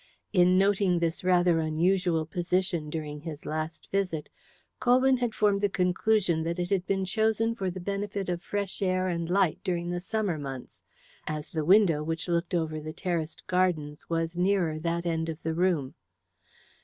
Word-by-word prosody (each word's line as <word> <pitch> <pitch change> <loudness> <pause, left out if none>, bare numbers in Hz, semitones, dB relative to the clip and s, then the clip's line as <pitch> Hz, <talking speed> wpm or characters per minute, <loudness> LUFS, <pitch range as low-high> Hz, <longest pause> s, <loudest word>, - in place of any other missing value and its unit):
In 180 +1 +5
noting 195 -2 +3
this 170 +1 -1
rather 175 -2 +4
unusual 165 +1 +1
position 175 -1 -1
during 150 -1 -5
his 155 -2 -7
last 155 +1 -4
visit, 185 -6 -1 0.5
Colwyn 255 +1 +4
had 240 -3 -2
formed 205 -2 +2
the 205 - +2
conclusion 180 -1 +1
that 170 +2 -2
it 175 +1 -3
had 185 -2 +1
been 195 -1 0
chosen 220 +3 +1
for 195 -5 -2
the 185 +1 -6
benefit 200 +1 -3
of 175 -1 -2
fresh 200 -1 -3
air 185 -1 +1
and 170 -2 -2
light 185 -3 +2
during 175 -1 -1
the 175 - -2
summer 200 -4 -1
months, 135 -3 -7 0.5
as 155 -1 -4
the 160 -2 -1
window, 180 -4 +5
which 165 +3 -3
looked 170 +1 0
over 160 -2 -1
the 155 +1 -7
terraced 170 -4 -3
gardens, 170 -5 0
was 165 0 -1
nearer 180 -4 +1
that 170 +1 -2
end 165 -1 -1
of 160 0 -6
the 160 - -1
room. 165 -6 +1
175 Hz, 170 wpm, -28 LUFS, 160-195 Hz, 0.5 s, In